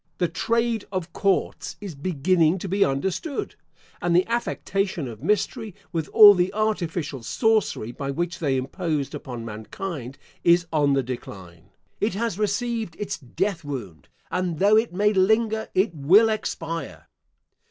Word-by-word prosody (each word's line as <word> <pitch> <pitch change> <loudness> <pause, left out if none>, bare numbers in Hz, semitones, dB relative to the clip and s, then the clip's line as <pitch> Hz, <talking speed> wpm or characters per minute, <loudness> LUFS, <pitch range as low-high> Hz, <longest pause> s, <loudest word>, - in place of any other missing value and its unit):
The 175 - +1
trade 230 +5 0
of 180 -3 -4
courts 195 -2 0
is 200 -4 -7
beginning 165 +3 +2
to 195 - -5
be 195 +2 +2
understood, 190 - -2 0.5
and 175 -1 +1
the 180 - +4
affectation 195 - -2
of 110 -3 -9
mystery, 210 -1 -1 0.2
with 165 -3 -2
all 210 -2 +9
the 180 -1 +1
artificial 175 - -1
sorcery 215 - 0
by 135 +2 -5
which 170 +5 -2
they 140 -5 +1
imposed 150 +1 -2
upon 120 -3 -6
mankind, 125 - -6 0.3
is 170 0 +5
on 145 -2 +3
the 135 -1 +2
decline. 95 -9 -8 0.3
It 210 -1 0
has 225 -2 -2
received 215 -2 -1
its 200 -4 -4
death 170 +6 -2
wound; 120 - -7 0.2
and 180 -3 -1
though 205 +5 +5
it 220 -1 +3
may 205 +4 +2
linger, 220 +3 +2
it 190 0 +2
will 180 +10 +5
expire. 165 -8 -4
180 Hz, 145 wpm, -24 LUFS, 145-210 Hz, 0.5 s, all